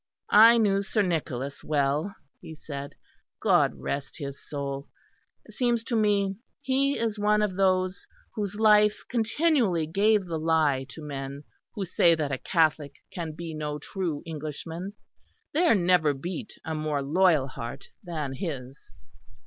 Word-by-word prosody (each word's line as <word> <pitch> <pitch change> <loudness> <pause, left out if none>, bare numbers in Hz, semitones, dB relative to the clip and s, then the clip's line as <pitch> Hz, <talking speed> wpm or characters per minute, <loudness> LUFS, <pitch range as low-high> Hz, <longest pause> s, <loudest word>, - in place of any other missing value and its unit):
"I 225 +3 +9
knew 200 -3 +3
Sir 205 +2 0
Nicholas 140 -6 -3
well," 150 +6 0 0.2
he 160 - -10
said, 140 -2 -7 0.4
"God - - +3
rest 140 0 -5
his 140 -3 -7
soul. 140 -1 -5 0.6
It - - -14
seems 240 -2 +1
to 235 - -2
me 200 -3 +2 0.2
he 275 0 +1
is 220 -2 -2
one 210 +1 +3
of 195 -3 -1
those 185 0 +1 0.3
whose 205 -2 -3
life 210 -1 +4
continually 230 - +2
gave 200 +5 +2
the 165 -2 -3
lie 155 -5 +2
to 160 - -10
men 140 -1 -6 0.3
who 200 - -2
say 170 -1 +4
that 150 -3 -2
a 135 - -2
Catholic 155 -4 +1 0.2
can 165 -3 -4
be 165 +1 -7
no 150 -1 -3
true 165 -1 -4
Englishman. 165 +4 -6 0.6
There 325 -3 +4
never 175 -6 +3
beat 180 - -6
a 160 - -3
more 155 -2 -1
loyal 160 -1 +3
heart 120 -2 -7
than 155 -7 -4
his." 135 -3 -6
170 Hz, 145 wpm, -27 LUFS, 145-205 Hz, 0.6 s, I